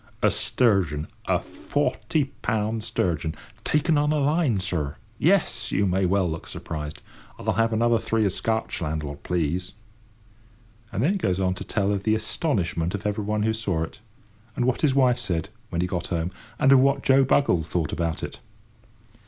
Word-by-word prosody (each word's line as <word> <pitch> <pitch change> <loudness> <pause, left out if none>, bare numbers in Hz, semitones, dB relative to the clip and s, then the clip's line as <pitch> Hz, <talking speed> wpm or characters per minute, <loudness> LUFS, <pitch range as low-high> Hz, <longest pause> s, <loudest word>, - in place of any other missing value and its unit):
A - - +5
sturgeon! 95 - +2 0.2
a - - +3
forty 140 -3 -1
pound 110 0 -1
sturgeon! 85 -7 -1 0.3
taken 150 0 +2
on 150 +1 +2
a 155 - +2
line, 145 - +2
sir! 85 -7 -2 0.2
Yes, 125 - +2
you 100 - +2
may 95 0 +2
well 95 0 +2
look 80 -1 -5
surprised—I'll 75 0 -6
have 115 0 +2
another 115 +1 +3
three 110 -1 +1
of 100 - +2
Scotch, 110 +2 -2
landlord, 75 -2 -3
please." 90 +2 -1 1.2
And 115 - -1
then 160 - +4
he 200 - 0
goes 95 - 0
on 90 -1 +1
to - - -6
tell 100 -2 0
of 100 -2 0
the 110 +2 +2
astonishment 100 - -1
of 105 - -6
everybody 105 +1 0
who 110 - +2
saw 100 -7 -1
it; 80 - -8 0.6
and 125 - 0
what 130 -1 +1
his 140 -4 +3
wife 125 -3 +4
said, 90 -6 -2 0.2
when 85 -3 -1
he 90 - 0
got 90 -2 -3
home, 85 0 -1 0.3
and 135 -2 +4
of 135 - +8
what 140 +1 +3
Joe 135 0 +5
Buggles 105 - +2
thought 80 -4 -1
about 85 -2 -2
it. - - -6
105 Hz, 175 wpm, -25 LUFS, 90-125 Hz, 1.2 s, of